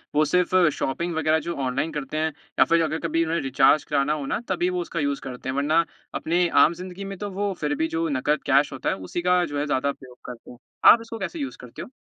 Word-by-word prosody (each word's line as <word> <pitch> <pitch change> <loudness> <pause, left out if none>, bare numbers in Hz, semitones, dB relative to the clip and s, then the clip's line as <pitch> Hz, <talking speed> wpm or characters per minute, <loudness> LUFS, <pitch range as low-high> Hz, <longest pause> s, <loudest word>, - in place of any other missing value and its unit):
वो 155 - +4
सिर्फ़ 180 +4 +1 0.2
शॉपिंग 170 +5 -2
वगैरह 160 0 +2
जो 170 - -2
ऑनलाइन 130 +5 -1
करते 150 +1 -5
हैं 160 0 0 0.3
या - - +7
फिर 165 0 +3
अगर 160 0 -2
कभी 165 +1 +1
उन्होंने 165 +1 -1
रीचार्ज 135 +2 +4
कराना 145 0 0
हो 150 -2 -4
ना, 135 - -1
तभी 180 -1 +1
वो 180 -1 -2
उसका 170 0 -4
यूज़ 140 -1 -1
करते 130 -1 -7
हैं, 130 - -2
वरना 155 +4 +2 0.3
अपनी 175 +2 +1 0.2
आम 165 - 0
ज़िंदगी 185 +2 -8
में 195 -1 -6
तो 205 +1 -5
वो 200 +1 -2
फिर 145 -1 0
भी 160 +2 0
जो 165 0 0
नकद 145 +2 0
कैश 140 +1 +3
होता 130 - -2
है, - - 0
उसी 95 - -5
का 180 0 +3
जो 145 -2 -4
है, 145 - -1
ज़्यादा 140 -1 0
उपयोग 130 -3 -9
करते 125 -1 -10
हैं। 120 - -13 0.3
आप 230 - +4
इसको 225 0 -8
कैसे 335 - -5
यूज़ 280 -2 -5
करते 125 -1 -10
हो? - - -9
155 Hz, 255 wpm, -24 LUFS, 140-175 Hz, 0.3 s, या